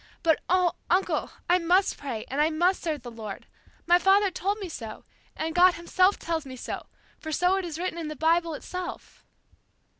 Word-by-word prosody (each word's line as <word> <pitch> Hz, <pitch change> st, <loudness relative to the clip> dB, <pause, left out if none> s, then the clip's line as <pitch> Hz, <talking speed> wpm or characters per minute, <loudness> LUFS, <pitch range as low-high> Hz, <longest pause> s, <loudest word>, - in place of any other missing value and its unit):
But, 320 Hz, -3 st, +3 dB
oh, 360 Hz, -1 st, +3 dB, 0.2 s
uncle, 370 Hz, +2 st, +1 dB, 0.2 s
I 355 Hz, +1 st, +4 dB
must 360 Hz, +3 st, +3 dB
pray, 250 Hz, -6 st, -5 dB
and 275 Hz, +3 st, -1 dB
I 310 Hz, -, +4 dB
must 350 Hz, +4 st, +1 dB
serve 305 Hz, -6 st, -3 dB
the 240 Hz, -, -7 dB
Lord. 220 Hz, -3 st, -8 dB, 0.4 s
My 350 Hz, +1 st, +5 dB
father 390 Hz, +2 st, +4 dB
told 395 Hz, +3 st, -1 dB
me 400 Hz, -3 st, -5 dB
so, 230 Hz, -9 st, -8 dB, 0.3 s
and 320 Hz, 0 st, -2 dB
God 360 Hz, +1 st, +6 dB
Himself 370 Hz, +3 st, +2 dB
tells 330 Hz, -2 st, -2 dB
me 260 Hz, -2 st, -9 dB
so, 250 Hz, -, -6 dB, 0.3 s
for 315 Hz, -, -6 dB
so 360 Hz, +4 st, +2 dB
it 385 Hz, -, -2 dB
is 320 Hz, -3 st, -5 dB
written 350 Hz, 0 st, -3 dB
down 335 Hz, -, -4 dB
in -, -, -4 dB
the 305 Hz, -, -5 dB
Bible 330 Hz, +2 st, +2 dB
itself." 360 Hz, +3 st, -7 dB
340 Hz, 200 wpm, -27 LUFS, 310-365 Hz, 0.4 s, God